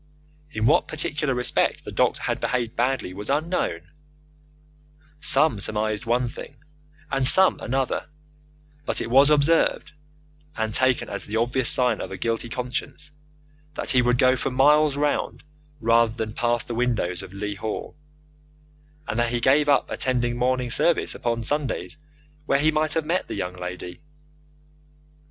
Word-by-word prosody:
In 110 -7 -2
what - - +3
particular 150 -2 -2
respect 125 0 0
the - - -7
doctor - - 0
had - - -2
behaved 120 -2 -2
badly 125 -6 -1
was 100 +2 -5
unknown 150 - -1 1.4
some 150 -5 +3
surmised 110 +2 -1
one 120 +1 +1
thing 125 +3 -9 0.6
and 135 -1 +2
some 190 +5 +6
another; 130 +1 -2 0.8
but - - 0
it 115 - -4
was 135 +3 +6
observed, 150 +2 +2 0.7
and 110 -1 -2
taken 130 0 +1
as 100 - -6
the 105 - -5
obvious 120 +2 +2
sign 125 -1 +3
of - - -5
a - - -7
guilty 115 0 -2
conscience, 125 +5 -4 0.6
that - - -2
he 130 -2 +4
would 125 0 +2
go 130 +1 +4
for - - -2
miles 145 +2 +3
round 145 0 -1 0.4
rather 115 -1 +3
than 110 -2 -4
pass 120 0 0
the 120 - -6
windows 115 -7 -1
of 95 -1 -11
Leigh 100 +1 -4
Hall, 105 +2 -6 1.1
and 115 - -2
that 120 0 +1
he 120 0 -1
gave 145 +5 +3
up 140 -2 +3
attending 120 -2 -1
morning 125 0 0
service 170 +7 +1
upon 115 -1 -2
Sundays 145 +3 -3 0.5
where 135 - +3
he 155 +3 +2
might 155 -1 0
have 160 -2 0
met 175 +4 -1
the - - -5
young 90 -2 -4
lady. 90 0 -7
125 Hz, 155 wpm, -24 LUFS, 115-140 Hz, 1.4 s, some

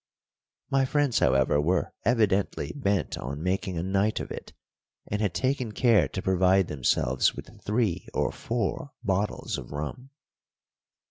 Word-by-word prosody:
My 135 -1 +3
friends, 140 -2 +2
however, 65 +3 +3
were 85 +4 0
evidently 105 -4 +1
bent 100 - 0
on 70 +5 -5
making 95 -1 -1
a 80 - -1
night 100 +3 +1
of - - -6
it, - - -7 0.5
and 105 +1 -2
had 100 -5 0
taken 130 -4 0
care 115 -1 +4
to 95 - -5
provide 95 0 +3
themselves 65 -2 +1
with - - -11
three 105 -4 0
or - - 0
four 130 +6 -3
bottles 100 -1 -1
of - - -10
rum. 75 - -5
100 Hz, 140 wpm, -27 LUFS, 85-120 Hz, 0.5 s, care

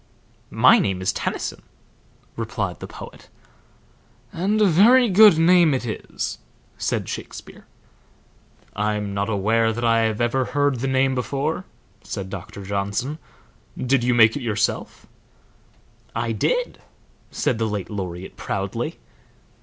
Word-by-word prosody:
"My - - +6
name 95 -2 -1
is 95 +1 0
Tennyson," - - -4 0.7
replied - - -3
the - - -7
poet. - - -12 1.0
"And 200 +5 0
a 210 - +5
very 225 +8 +6
good 200 -2 +7
name 165 -2 +5
it 125 - -3
is," 110 - -5 0.4
said - - -2
Shakespeare. - - -8 1.1
"I 105 0 0
am 105 -1 -4
not 100 +2 -1
aware 110 +2 +2
that 120 +2 -3
I 115 -1 +3
ever 120 +4 0
heard 145 -2 0
the 135 - -2
name 130 0 +2
before," 140 +7 -2 0.4
said 95 -2 -6
Doctor 100 +1 -8
Johnson. 100 +9 -3 0.6
"Did 130 -1 +1
you 125 0 +2
make 110 -1 +6
it 145 - -4
yourself?" 110 -3 -2 1.1
"I 115 0 -1
did," - - -1 0.5
said 115 - -1
the 110 - 0
late 105 -1 -4
laureate, 95 -2 -6
proudly. 105 - -4
120 Hz, 130 wpm, -22 LUFS, 105-145 Hz, 1.1 s, good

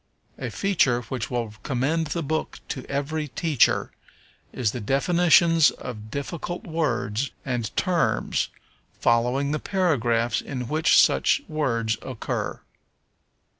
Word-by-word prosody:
A - - -3
feature 150 -11 +2
which 120 +1 -4
will 120 -4 -2
commend 145 +5 0
the 165 +2 -2
book 155 +2 -2
to 130 - -4
every 150 +3 -2
teacher 150 -2 +2 0.6
is 120 -6 0
the 120 - -5
definitions 165 - +4
of 110 -3 -8
difficult 170 - -5
words 130 - -1 0.2
and 120 -5 -2
terms, 180 -3 +1 0.5
following 125 +4 +2
the 150 - -1
paragraphs 120 - +1
in 125 -3 -5
which 155 +5 +3
such 280 - +4
words 115 -8 -1
occur. 130 -4 -4
140 Hz, 115 wpm, -25 LUFS, 120-160 Hz, 0.6 s, definitions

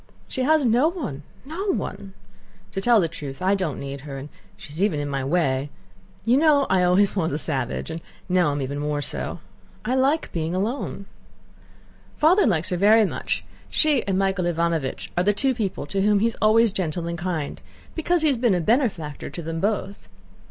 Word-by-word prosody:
She 260 - -3
has 300 +1 +3
no 245 +6 +4
one, 290 - -5 0.2
no 375 +8 -2
one. 195 0 -6 0.6
To 195 - -3
tell 235 +1 +5
the 170 - +2
truth, 145 -4 -8
I 185 +2 +2
don't 185 -7 -1
need 140 0 -6
her, 140 -1 -7
and 140 +2 -8 0.3
she's 150 +4 -8
even 195 -7 +2
in 145 - -2
my 135 -1 -2
way. 140 -2 0 0.6
You 240 +3 +4
know 290 -2 +4
I 190 -1 +4
always 185 +3 +3
was 165 -5 0
a 145 - -1
savage, 135 -1 -2
and 165 +1 -5 0.3
now 180 -4 +3
am 145 -1 -2
even 140 +2 -4
more 145 0 -1
so. - - -4 0.4
I 250 - 0
like 270 +5 +1
being 165 +1 -2
alone.... 205 0 -2 1.1
Father 345 +5 +5
likes 170 -6 +1
her 180 - -1
very 215 +4 +6
much. - - -2 0.2
She 300 -5 +3
and 190 -1 +1
Michael 190 -2 +1
Ivánovich 170 -5 -1
are 175 - +2
the 205 +2 +3
two 265 +5 +1
people 210 - -3
to 195 +6 -1
whom 210 +1 +4
he 205 - +2
is 230 - -1
always 220 +1 +5
gentle 175 -4 -2
and 170 - -2
kind, 170 -4 -3 0.3
because 340 +1 0
he - - +4
has 275 -4 +2
been 230 -5 +3
a - - +1
benefactor 190 - 0
to 155 +4 -7
them 165 +1 -4
both. 200 - -2
190 Hz, 195 wpm, -24 LUFS, 155-230 Hz, 1.1 s, very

